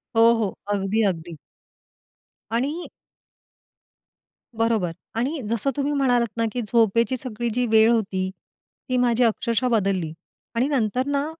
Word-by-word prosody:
हो, 225 - +5
हो. 225 -3 0 0.2
अगदी, 200 +2 0
अगदी. 170 -2 -6 1.2
आणि 280 +9 -2 1.7
बरोबर 225 -6 +1 0.2
आणि 270 +6 -1
जसं 230 +4 0
तुम्ही 285 +1 0
म्हणालात 245 -5 +1
ना, 230 - +1
की 245 - -2
झोपेची 230 +3 +2
सगळी 240 -2 -4
जी 250 +2 +1
वेळ 220 0 +5
होती 190 -5 0 0.6
ती 255 - +1
माझी 245 -1 +3
अक्षरशः 235 +1 +1
बदलली 195 -8 0 0.4
आणि 240 +3 +2
नंतर 255 -3 0
ना, 285 0 0
230 Hz, 125 wpm, -23 LUFS, 215-250 Hz, 1.7 s, हो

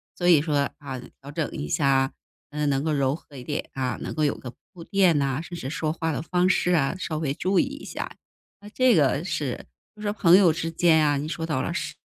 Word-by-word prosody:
所 175 - -1
以 160 -5 +7
说， 145 -3 0
啊， 135 -3 -6 0.2
调 140 +1 -9
整 155 0 -2
一 75 - -5
下， 135 - +2 0.4
嗯， 150 0 -1
能 135 0 0
够 155 -1 0
柔 140 -1 +1
和 150 -2 -15
一 125 - -8
点， 150 +1 -4
啊， 130 -2 -2
能 - - -4
够 155 - -1
有 145 - +2
个 125 -2 -9 0.2
铺 170 - -10
垫 185 -5 +3
呐， 140 0 0
甚 175 +1 -8
至 130 - -5
说 155 -1 -1
话 160 0 -2
的 155 - -2
方 180 +2 +1
式 180 -1 +2
啊， 150 +1 +2
稍 155 -4 -3
微 150 -3 -1
注 185 +5 +1
意 - - +5
一 - - -8
下。 - - -5 0.5
那 205 - -11
这 255 +2 +3
个 145 +1 +2
是 145 -9 -3 0.3
就 210 - -13
说 205 - -1
朋 180 -3 +6
友 175 -5 +5
之 165 0 -3
间 160 -2 +4
啊， 145 -1 +2
你 145 - -3
说 160 0 -3
到 150 -5 0
了 - - -2
是 - - -4
155 Hz, 265 characters per minute, -25 LUFS, 140-170 Hz, 0.5 s, 以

